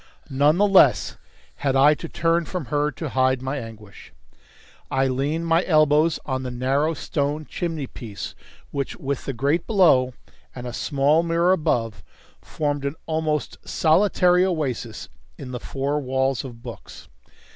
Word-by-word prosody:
None 145 Hz, +4 st, +3 dB
the 205 Hz, -, +4 dB
less 195 Hz, -2 st, +4 dB, 0.4 s
had 135 Hz, -1 st, 0 dB
I 140 Hz, +3 st, +6 dB
to 165 Hz, +2 st, -7 dB
turn 170 Hz, 0 st, +1 dB
from 180 Hz, -4 st, -5 dB
her 145 Hz, 0 st, +2 dB
to 155 Hz, 0 st, -6 dB
hide 130 Hz, 0 st, +2 dB
my 135 Hz, +3 st, -3 dB
anguish. 110 Hz, -4 st, -11 dB, 0.8 s
I 135 Hz, 0 st, +1 dB
leaned 140 Hz, +6 st, -1 dB
my 165 Hz, +2 st, +3 dB
elbows 155 Hz, -1 st, +3 dB
on 130 Hz, -2 st, -2 dB
the 130 Hz, -, -4 dB
narrow 135 Hz, +6 st, 0 dB
stone 145 Hz, +1 st, -2 dB
chimney 165 Hz, -4 st, -4 dB
piece, 110 Hz, -6 st, -8 dB, 0.4 s
which, 140 Hz, -2 st, -3 dB
with 140 Hz, -1 st, -4 dB
the 135 Hz, -, -3 dB
grate 140 Hz, +8 st, 0 dB
below 145 Hz, -, +4 dB, 0.4 s
and 125 Hz, -1 st, -7 dB
a 120 Hz, -, -5 dB
small 145 Hz, +4 st, +2 dB
mirror 170 Hz, +1 st, +2 dB
above, 115 Hz, -11 st, 0 dB, 0.4 s
formed 145 Hz, -2 st, -3 dB
an 140 Hz, +2 st, -2 dB
almost 155 Hz, -2 st, -2 dB
solitary 180 Hz, +1 st, +3 dB
oasis 125 Hz, -, -2 dB, 0.3 s
in 125 Hz, -, -8 dB
the 125 Hz, -, -4 dB
four 140 Hz, +4 st, -2 dB
walls 130 Hz, -1 st, -1 dB
of 120 Hz, -3 st, -10 dB
books. -, -, -10 dB
145 Hz, 150 wpm, -23 LUFS, 130-165 Hz, 0.8 s, I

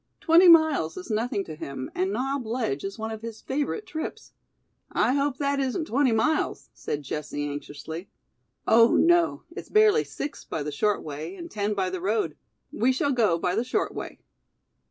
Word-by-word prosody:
Twenty 340 Hz, +3 st, +6 dB
miles 315 Hz, -, +5 dB
is 185 Hz, -, -7 dB
nothing 215 Hz, -2 st, 0 dB
to 160 Hz, -4 st, -8 dB
him 135 Hz, -3 st, -6 dB
and 190 Hz, +2 st, 0 dB
Knob 265 Hz, +4 st, -1 dB
Ledge 220 Hz, -, -2 dB
is 195 Hz, +2 st, -5 dB
one 220 Hz, 0 st, -4 dB
of 220 Hz, -1 st, -6 dB
his 225 Hz, -1 st, -7 dB
favorite 290 Hz, +10 st, -2 dB
trips." 315 Hz, -4 st, -6 dB, 0.6 s
"I -, -, +2 dB
hope 280 Hz, -1 st, 0 dB
that 280 Hz, 0 st, 0 dB
isn't 270 Hz, +4 st, -1 dB
twenty 265 Hz, -1 st, +2 dB
miles," 265 Hz, +8 st, 0 dB
said 145 Hz, 0 st, -4 dB
Jessie 145 Hz, +1 st, -4 dB
anxiously. 145 Hz, +4 st, -7 dB, 0.6 s
"Oh, 230 Hz, +1 st, +6 dB
no, 345 Hz, 0 st, +3 dB
it's -, -, -9 dB
barely 430 Hz, +1 st, +5 dB
six 290 Hz, -, -6 dB
by 155 Hz, -, -4 dB
the 150 Hz, -, -4 dB
short 210 Hz, +8 st, 0 dB
way 155 Hz, +4 st, -6 dB
and 340 Hz, +7 st, -9 dB
ten 210 Hz, 0 st, -1 dB
by 190 Hz, -2 st, -1 dB
the 185 Hz, -1 st, -4 dB
road. 200 Hz, -5 st, 0 dB, 0.4 s
We 245 Hz, +4 st, +2 dB
shall 275 Hz, +2 st, 0 dB
go 220 Hz, -10 st, +2 dB
by 180 Hz, +1 st, -1 dB
the 225 Hz, +5 st, +1 dB
short 250 Hz, -, -1 dB
way." -, -, -6 dB
225 Hz, 180 wpm, -26 LUFS, 175-280 Hz, 0.6 s, Twenty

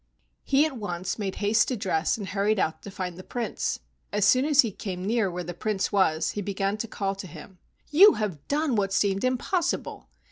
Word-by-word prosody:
He 280 Hz, +2 st, +3 dB
at 290 Hz, -5 st, -4 dB
once 180 Hz, -2 st, -4 dB
made 195 Hz, -2 st, -3 dB
haste 215 Hz, +2 st, +2 dB
to 255 Hz, -, -2 dB
dress 175 Hz, -3 st, 0 dB
and 200 Hz, -3 st, -6 dB
hurried 205 Hz, +2 st, +1 dB
out 160 Hz, -4 st, -1 dB
to -, -, -9 dB
find 185 Hz, -3 st, -5 dB
the -, -, -8 dB
Prince. 240 Hz, +3 st, -3 dB, 0.3 s
As 205 Hz, -1 st, +2 dB
soon 255 Hz, +6 st, +4 dB
as 295 Hz, -1 st, +6 dB
he 230 Hz, -, -3 dB
came 185 Hz, -2 st, -5 dB
near 220 Hz, -2 st, +1 dB
where 180 Hz, 0 st, -4 dB
the 175 Hz, +1 st, -6 dB
Prince 200 Hz, +2 st, -2 dB
was, 165 Hz, -5 st, +2 dB
he 205 Hz, -, -4 dB
began 200 Hz, 0 st, -1 dB
to 230 Hz, -, -4 dB
call 195 Hz, -2 st, -2 dB
to 195 Hz, -1 st, -8 dB
him. 180 Hz, +3 st, -12 dB, 0.3 s
"You 390 Hz, +8 st, +8 dB
have 190 Hz, -9 st, -4 dB
done 290 Hz, -3 st, 0 dB
what 195 Hz, -2 st, 0 dB
seemed 195 Hz, -1 st, +1 dB
impossible. 320 Hz, +8 st, -1 dB
205 Hz, 210 wpm, -26 LUFS, 185-235 Hz, 0.3 s, You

